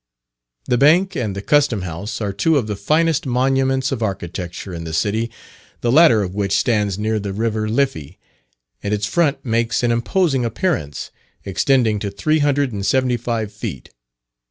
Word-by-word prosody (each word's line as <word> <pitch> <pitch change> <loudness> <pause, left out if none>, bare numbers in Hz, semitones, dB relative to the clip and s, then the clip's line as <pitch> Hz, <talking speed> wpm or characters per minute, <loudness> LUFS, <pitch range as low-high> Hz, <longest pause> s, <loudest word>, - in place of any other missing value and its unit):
The 125 - +1
Bank 175 +7 +4
and 105 -5 -2
the 100 - -5
Custom 140 -9 +2
House 90 +6 -5
are 100 -2 -2
two 160 - +2
of 125 - 0
the 105 -1 -3
finest 155 - +1
monuments 135 +1 +1
of 130 -4 -3
architecture 90 -2 -4
in 85 -1 -6
the 80 -1 -6
city; 110 +7 0 0.5
the 120 - +1
latter 130 -7 +6
of 90 -1 -5
which 100 -1 -1
stands 105 -5 +1
near 110 +1 -1
the 100 -1 -4
river 110 0 -1
Liffey, 95 - -1 0.6
and 105 +1 -1
its 105 0 -2
front 145 +5 0
makes 115 0 0
an 120 - +2
imposing 135 +3 +1
appearance, 120 - -2 0.3
extending 110 +2 +2
to 100 - -3
three 155 +11 0
hundred 145 -2 +1
and 100 -2 -4
seventy 130 +3 +2
five 115 -3 -3
feet. 70 - -7
115 Hz, 170 wpm, -20 LUFS, 100-135 Hz, 0.6 s, latter